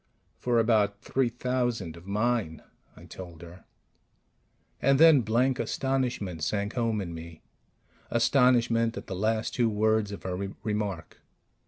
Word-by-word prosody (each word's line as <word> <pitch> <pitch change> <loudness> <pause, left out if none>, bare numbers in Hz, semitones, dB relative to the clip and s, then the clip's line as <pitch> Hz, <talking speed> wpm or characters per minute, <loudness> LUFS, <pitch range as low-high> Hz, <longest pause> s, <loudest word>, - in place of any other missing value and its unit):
"For 120 -1 +1
about 105 -3 +2
three 130 -2 0
thousand 120 -7 -2
of 85 +2 -14
mine," 105 -6 -1 0.3
I - - -14
told 85 -3 -10
her. 85 +2 -13 1.2
And 135 0 +3
then 160 -4 +7
blank 125 +4 +1
astonishment 125 - -2
sank 100 +5 -1
home 115 -4 0
in 85 -3 -6
me 80 0 -10 0.7
astonishment 115 -2 +3
at - - -6
the - - -6
last 110 +3 -1
two 120 -2 +2
words 110 0 +1
of 100 - -8
her 90 -1 -3 0.3
remark. 105 -5 -4
110 Hz, 135 wpm, -28 LUFS, 95-120 Hz, 1.2 s, then